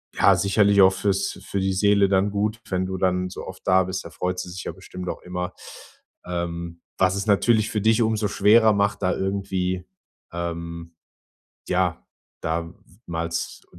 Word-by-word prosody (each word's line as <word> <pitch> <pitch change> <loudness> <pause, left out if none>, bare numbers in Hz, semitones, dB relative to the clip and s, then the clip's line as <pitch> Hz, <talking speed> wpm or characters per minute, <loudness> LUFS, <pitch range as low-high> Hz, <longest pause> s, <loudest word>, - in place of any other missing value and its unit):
ja, - - +5
sicherlich 100 0 +4
auch 95 0 +7
fürs 100 0 -1
für 100 - -2
die 95 0 0
Seele 100 0 +3
dann 95 +1 +2
gut, 105 +2 -1
wenn 95 0 0
du 95 0 -4
dann 90 0 0
so 90 - -8
oft 95 0 -9
da 95 0 +5
bist, 95 +1 -4
da - - -7
freut 90 +3 -3
sie 90 - -5
sich 90 -1 -7
ja - - -3
bestimmt 90 0 -9
auch - - -5
immer, 90 0 -4 0.7
ähm, 85 -1 -4 0.2
was 95 0 +3
es 100 +1 -3
natürlich 110 +2 +3
für 105 - 0
dich 110 +2 +3
umso 110 -1 +1
schwerer 110 +3 +5
macht, 100 0 0
da 90 - +2
irgendwie, 95 -2 -2 0.5
ähm 85 -1 -5 0.7
ja, - - 0 0.4
da 85 +1 -2 0.3
mal 85 0 -3
z 85 - -4
95 Hz, 175 wpm, -24 LUFS, 90-100 Hz, 0.7 s, auch